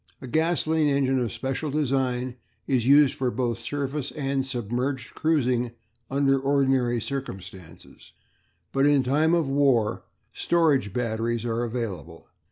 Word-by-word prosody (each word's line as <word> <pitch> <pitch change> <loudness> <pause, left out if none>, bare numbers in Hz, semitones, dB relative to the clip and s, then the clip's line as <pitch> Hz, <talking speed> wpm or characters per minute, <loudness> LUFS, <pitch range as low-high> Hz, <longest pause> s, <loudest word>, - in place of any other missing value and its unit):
A - - -9
gasolene 160 +2 +1
engine 135 -2 +2
of 120 -4 -1
special 135 +6 -3
design 130 -3 -1 0.3
is 125 -3 0
used 140 0 +6
for 130 -1 -1
both 120 -2 -2
surface 145 -1 -3
and 135 -2 -1
submerged 125 +1 -3
cruising 125 -7 0 0.4
under 135 0 +2
ordinary 135 -3 +1
circumstances, 95 - -8 0.6
but 135 +1 +3
in 145 -2 +4
time 155 +6 +2
of 165 -4 +1
war 135 -6 +2 0.3
storage 150 - +2
batteries 115 +1 -2
are 115 0 -1
available. 100 - -5
130 Hz, 125 wpm, -25 LUFS, 120-140 Hz, 0.6 s, used